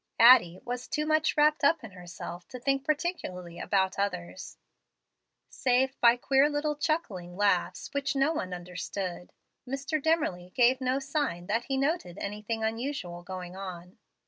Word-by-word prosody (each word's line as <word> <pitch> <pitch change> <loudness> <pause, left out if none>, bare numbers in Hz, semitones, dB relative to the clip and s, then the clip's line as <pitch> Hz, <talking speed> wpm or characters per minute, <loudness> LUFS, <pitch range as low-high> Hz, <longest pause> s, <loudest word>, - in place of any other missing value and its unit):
Addie 225 -7 +7
was 245 0 -4
too 300 0 -1
much 310 0 +2
wrapped 300 0 +4
up 305 +1 +4
in 225 - -9
herself 175 -1 -9
to 250 - -8
think 275 +2 0
particularly 280 - -3
about 190 -1 0
others. 185 -2 -4 0.9
Save 260 +1 +1
by 235 0 +7
queer 270 +3 +3
little 300 0 -1
chuckling 210 - -2
laughs, 200 -3 +1
which 280 0 -1
no 275 +4 +2
one 185 - -3
understood, 180 +1 -5 0.4
Mr. 280 +4 -2
Dimmerly 190 - 0
gave 255 +2 +4
no 255 +1 +1
sign 275 - -2
that 225 +5 -1
he 270 - -1
noted 275 - -1
any 205 +1 -5
thing 225 +1 -3
unusual 225 -6 -3
going 180 0 -7
on. 180 -1 -8
235 Hz, 150 wpm, -29 LUFS, 180-280 Hz, 0.9 s, Addie